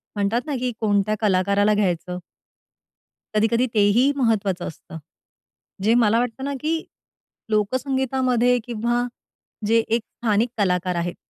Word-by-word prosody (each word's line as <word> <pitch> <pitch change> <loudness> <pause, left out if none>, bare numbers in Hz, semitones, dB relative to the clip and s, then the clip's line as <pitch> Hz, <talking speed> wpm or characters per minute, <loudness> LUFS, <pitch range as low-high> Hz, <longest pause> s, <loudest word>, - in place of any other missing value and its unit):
म्हणतात 205 +4 0
ना, 295 -3 -3
की 250 -1 -1
कोणत्या 210 -1 +1
कलाकाराला 200 +1 +3
घ्यायचं? 180 -3 -1 1.2
कधी-कधी 230 +3 +3
तेही 215 +6 +4
महत्त्वाचं 205 -7 0
असतं. 160 0 -10 0.9
जे 225 +2 +4
मला 225 +2 +3
वाटतं 245 +2 -3
ना, 280 - -2
की 320 +1 -1 0.7
लोकसंगीतामध्ये 255 +2 +1
किंवा 240 +1 -1 0.6
जे 230 +1 +4
एक 230 +1 +1 0.2
स्थानिक 220 +2 +2
कलाकार 180 -2 +1
आहेत. 170 +1 -2
220 Hz, 115 wpm, -23 LUFS, 200-245 Hz, 1.2 s, तेही